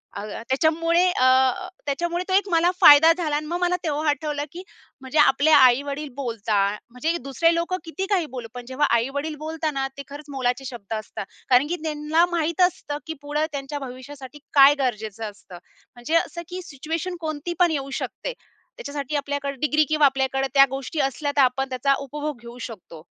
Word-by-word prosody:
अ, - - -4 0.3
त्याच्यामुळे 330 +5 +2
अ, 255 - +1 0.6
त्याच्यामुळे 345 +5 -1
तो 375 - -2
एक 400 +1 +3 0.3
फायदा 300 +3 +9
झाला 325 -4 -2
आणि 305 +1 -2
मग 345 +3 -3
मला 355 0 +2
तेव्हा 305 -1 -1
आठवलं 295 -1 -1
की 355 +3 -8 0.4
म्हणजे 265 +3 -1
आपले 290 +2 +4
आई-वडील 280 +1 +4
बोलतात, 215 -6 -1
म्हणजे 300 +8 -2
दुसरे 330 +6 +2
लोक 340 +2 -2
किती 375 +4 -4
काही 370 -5 +2
बोलू, 235 -2 -5
पण 245 -1 -8
जेव्हा 270 +3 +1
आई-वडील 285 +6 -2
बोलताना 310 -4 -2
ते 280 - -6
खरंच 290 +1 -9
मोलाचे 260 -1 -2
शब्द 235 -5 -7
असता, 215 -2 -5 0.3
कारण 255 +3 +5
की 350 - 0
त्यांना 310 +2 +1
माहित 335 +2 0
असतं 290 -4 -6
की 320 - -3
पुढे 295 +2 -1
त्यांच्या 280 +1 -5
भविष्यासाठी 260 +1 -9
काय 280 0 +8
गरजेचं 220 -4 -3
असतं. 185 -3 -14 0.4
म्हणजे 240 +7 -2
असं 340 +1 0
की 365 +1 -5
सिच्युएशन 325 +4 -5
कोणती 310 +2 -4
पण 350 -2 +4
येऊ 275 -3 -3
शकते. - - -5 0.4
त्याच्यासाठी 290 - -5
आपल्याकडे 280 -1 -2
डिग्री 305 0 +3
किंवा 305 -1 +4
आपल्याकडे 270 0 +1
त्या 275 -1 +8
गोष्टी 270 +4 -5
असल्या 275 +2 -1
तर - - +6
आपण 265 +1 +1
त्याचा 260 +2 +1
उपभोग 290 0 -5
घेऊ 235 +1 -11
शकतो. 170 -5 -12
290 Hz, 175 wpm, -23 LUFS, 260-315 Hz, 0.6 s, फायदा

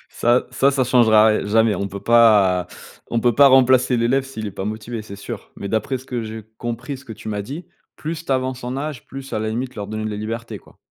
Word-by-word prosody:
ça 120 +2 +2
ça, 135 +2 +3
ça 135 -1 +1
changera 110 -3 +5
ri 110 -2 +1
jamais. 110 0 +3
On 100 +2 -3
peut 100 +1 -7
pas 105 -6 +5 0.4
on 120 - +1
peut 120 0 +2
pas 140 +3 +7
remplacer 130 -1 +4
l'élève 120 +3 +1
s'il 110 -5 -6
est - - -4
pas 95 - -5
motivé, 110 +2 -5
c'est 100 -2 -10
sûr. - - -8
Mais 100 - -6
d'après 120 +5 -1
ce 130 - -14
que 120 -2 -3
j'ai 110 0 -7
compris, 120 +4 -4
ce 130 - -16
que 110 - -8
tu 110 - -9
m'as 105 -1 -2
dit, 150 - -7 0.3
plus 160 +1 -5
tu 140 - -1
avances 130 -1 -2
en 125 +2 -3
âge, 145 -1 -5
plus 135 0 -9
à - - 0
la 110 0 -2
limite 125 +3 -3
leur 100 -2 -5
donner 110 0 -4
de 110 - -2
la 105 - -4
liberté, 110 0 -5
quoi? - - -22
115 Hz, 255 wpm, -21 LUFS, 110-130 Hz, 0.4 s, pas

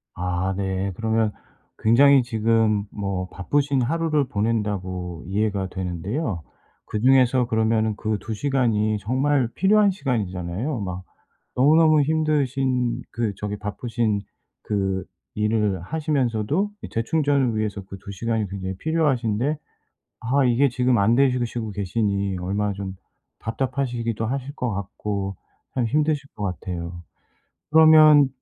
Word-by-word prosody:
아 90 +1 -1
네. 95 0 -1
그러면 110 -1 +1 0.5
굉장히 135 +4 +6
지금 110 -2 +1
뭐 100 -2 -3
바쁘신 140 +6 0
하루를 155 0 +1
보낸다고 100 -6 -2
이해가 100 0 -1
되는데요. 95 - -3 0.4
그중에서 125 +2 +3
그러면은 110 -1 +1
그 110 0 -2
2 110 - -5
시간이 110 -4 +1
정말 130 +3 +1
필요한 205 +2 +4
시간이잖아요. 110 - -2
막 90 -1 -5 0.5
너무너무 155 +3 +5
힘드신 135 -5 0
그 115 -3 -1
저기 105 0 -4
바쁘신 110 0 -2 0.4
그 95 -2 -1 0.3
일을 105 -4 0
하시면서도 145 - 0
이 - - -7
재충전을 140 0 +1
위해서 105 -2 -2
그 95 0 -9
2 100 - -7
시간이 110 +1 -1
굉장히 95 -1 -5
필요하신데 145 -4 0 0.6
아 130 +3 +2
이게 125 +3 +3
지금 125 0 +2
안 110 +4 +3
되시고 125 -2 +3
시고 115 -2 -4
계시니 100 -1 -1
얼마나 100 +3 -1
좀 95 -1 -5 0.5
답답하시기도 120 -2 -2
하실 135 +4 -4
것 125 -4 -2
같고 100 0 -4 0.4
참 125 -2 +1
힘드실 150 +2 0
것 105 - -5
같아요. 85 -2 -5 0.7
그러면 155 -3 +7
115 Hz, 280 characters per minute, -23 LUFS, 100-135 Hz, 0.7 s, 그러면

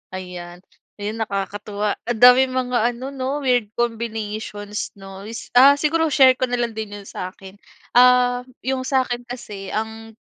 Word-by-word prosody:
Ayan, 180 -1 -8 0.4
'yon 210 +2 -4
nakakatuwa 205 0 -3
ang 240 -2 -2
daming 255 +1 +7
mga 250 -1 0 0.2
ano 260 +3 -6
'no 275 +2 -3
weird 245 -4 +2
combinations 215 -3 -3
'no 195 0 -10
s 225 +1 -8
ah, 275 +3 +8
siguro 320 +3 +1
share 265 -3 +6
ko 255 - +1
na 245 - -1
lang 240 -1 -1
din 215 -2 -6
'yong 205 - -9
sa'kin. 190 +2 -8 0.3
Ah, 250 0 +5 0.2
'yong 260 0 -2
sa 265 -1 +2
akin 245 -1 -5
kasi 210 -5 -8
ang 220 +1 -5
230 Hz, 155 wpm, -21 LUFS, 205-255 Hz, 0.4 s, ah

